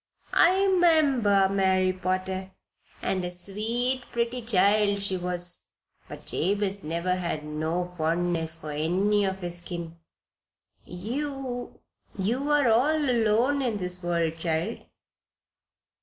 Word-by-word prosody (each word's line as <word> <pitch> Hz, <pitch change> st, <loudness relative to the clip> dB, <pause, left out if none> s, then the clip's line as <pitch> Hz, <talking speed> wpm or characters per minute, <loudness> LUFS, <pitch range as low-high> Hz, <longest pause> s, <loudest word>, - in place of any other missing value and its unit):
I 380 Hz, +3 st, +5 dB
'member 285 Hz, -, +4 dB
Mary 190 Hz, -1 st, +2 dB
Potter, 185 Hz, +1 st, -3 dB, 0.5 s
and 190 Hz, -1 st, -1 dB
a 180 Hz, -, -2 dB
sweet, 225 Hz, +8 st, 0 dB
pretty 235 Hz, +1 st, -1 dB
child 205 Hz, -1 st, +3 dB
she 200 Hz, -1 st, 0 dB
was. 180 Hz, -1 st, -1 dB, 0.4 s
But -, -, -10 dB
Jabez 200 Hz, +2 st, 0 dB
never 170 Hz, +4 st, -1 dB
had 170 Hz, -4 st, -3 dB
no 160 Hz, +4 st, -3 dB
fondness 165 Hz, 0 st, 0 dB
for 155 Hz, -2 st, -8 dB
any 190 Hz, +7 st, +1 dB
of 190 Hz, 0 st, -3 dB
his 175 Hz, 0 st, -4 dB
kin. 170 Hz, -1 st, -7 dB, 0.9 s
You 250 Hz, +6 st, -5 dB, 0.4 s
you 240 Hz, +9 st, -1 dB
are 295 Hz, -3 st, +3 dB
all 255 Hz, +8 st, +3 dB
alone 235 Hz, +5 st, +2 dB
in 235 Hz, -5 st, -1 dB
the 180 Hz, -2 st, -2 dB
world, 170 Hz, -2 st, -1 dB
child?" 165 Hz, +6 st, -1 dB
190 Hz, 115 wpm, -26 LUFS, 175-235 Hz, 0.9 s, I